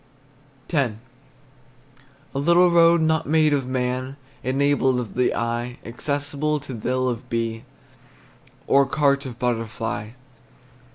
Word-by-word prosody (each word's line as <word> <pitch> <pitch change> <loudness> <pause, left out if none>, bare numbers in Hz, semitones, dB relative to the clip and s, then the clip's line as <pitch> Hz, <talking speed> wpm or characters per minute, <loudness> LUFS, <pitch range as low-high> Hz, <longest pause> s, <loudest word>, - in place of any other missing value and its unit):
X. 135 -8 +1 1.4
A 135 - -2
little 170 +4 +4
road 170 0 +5
not 160 0 +1
made 155 -1 +4
of 135 -3 0
man, 130 +1 -2 0.3
Enabled 135 0 +2
of 120 -3 -5
the 125 0 +1
eye, 120 +1 -2
Accessible 145 +4 -2
to 135 -1 -8
thill 130 +3 -1
of 125 0 -4
bee, 115 -1 -2 1.0
Or 140 0 +4
cart 140 -1 +1
of 120 -2 -8
butterfly. 115 -2 -3
130 Hz, 115 wpm, -23 LUFS, 120-145 Hz, 1.4 s, road